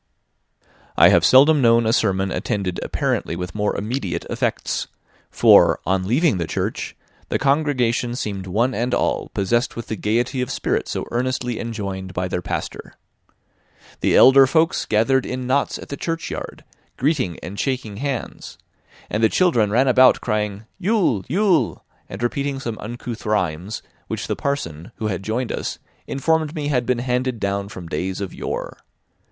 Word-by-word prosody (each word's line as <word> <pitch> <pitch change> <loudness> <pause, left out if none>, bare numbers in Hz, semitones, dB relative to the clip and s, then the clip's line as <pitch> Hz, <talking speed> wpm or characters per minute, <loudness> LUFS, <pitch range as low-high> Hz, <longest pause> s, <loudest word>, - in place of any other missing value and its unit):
I - - +8
have - - +4
seldom 145 +3 +6
known 115 -1 +4
a 110 - +2
sermon 95 -3 +1
attended 95 -2 -2
apparently - - -1
with 90 +1 -5
more 105 -1 -1
immediate 100 -6 -3
effects; - - -1 0.4
for, - - +5
on 95 +1 0
leaving 130 - +2
the 85 - -2
church, - - -3 0.3
the - - +1
congregation 130 -5 +1
seemed 100 -6 -4
one 115 +8 +1
and 120 +2 0
all - - -1
possessed 120 +6 0
with 115 - -7
the 110 - -1
gaiety 120 +5 0
of 125 - -2
spirit - - -1
so - - -3
earnestly 125 -1 -1
enjoined 100 -5 -5
by 90 0 -1
their 90 -1 -2
pastor. - - -5 1.0
The - - +2
elder 135 +1 +8
folks 160 +4 +2
gathered 120 +5 +2
in 125 0 -4
knots 135 +3 +1
in - - -9
the 140 - -6
churchyard, 165 0 -5 0.3
greeting 130 - 0
and 100 +3 -6
shaking 125 -7 -2
hands; 135 0 -5 0.5
and 110 +2 -2
the 110 - +6
children 140 - +3
ran 125 +6 +3
about 130 0 +6
crying, 105 -2 -2
Ule! 190 - +1
Ule! 185 - +1 0.2
and 95 +5 -6
repeating 140 +3 -1
some 115 -4 -5
uncouth 120 +1 -6
rhymes,* 95 -1 -2 0.2
which - - -4
the - - -2
parson, 85 - -3
who 110 - -3
had 95 -2 -3
joined 115 +5 -2
us, - - -3 0.3
informed 160 +3 0
me 145 -2 -2
had 125 -4 0
been 125 -1 +2
handed 125 0 -1
down 100 0 -2
from 90 -4 -9
days 90 +4 -3
of 100 -3 -5
yore. - - -5
120 Hz, 160 wpm, -21 LUFS, 100-135 Hz, 1.0 s, I